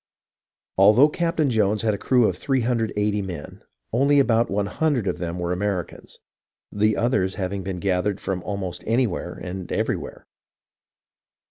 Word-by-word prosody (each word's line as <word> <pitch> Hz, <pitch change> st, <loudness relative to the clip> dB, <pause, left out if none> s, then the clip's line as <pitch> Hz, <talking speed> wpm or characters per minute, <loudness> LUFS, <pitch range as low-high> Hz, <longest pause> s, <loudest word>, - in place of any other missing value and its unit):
Although 110 Hz, +9 st, +7 dB
Captain 165 Hz, -3 st, 0 dB
Jones 105 Hz, -2 st, +1 dB
had 110 Hz, -2 st, +2 dB
a -, -, -2 dB
crew 125 Hz, 0 st, +3 dB
of 90 Hz, -, -1 dB
380 110 Hz, -4 st, 0 dB
men, 90 Hz, -6 st, -7 dB, 0.3 s
only 140 Hz, +4 st, +3 dB
about 115 Hz, -3 st, +3 dB
100 105 Hz, +6 st, 0 dB
of 90 Hz, -2 st, -2 dB
them 85 Hz, 0 st, -4 dB
were 90 Hz, 0 st, -2 dB
Americans, 95 Hz, -1 st, -4 dB, 0.5 s
the 105 Hz, +1 st, +1 dB
others 115 Hz, -6 st, +1 dB
having 95 Hz, 0 st, -3 dB
been 95 Hz, 0 st, -4 dB
gathered 95 Hz, +1 st, 0 dB
from 95 Hz, -2 st, -3 dB
almost 95 Hz, -1 st, -4 dB
anywhere 110 Hz, -7 st, 0 dB
and 90 Hz, 0 st, -7 dB
everywhere. -, -, -3 dB
105 Hz, 135 wpm, -23 LUFS, 95-120 Hz, 0.5 s, Although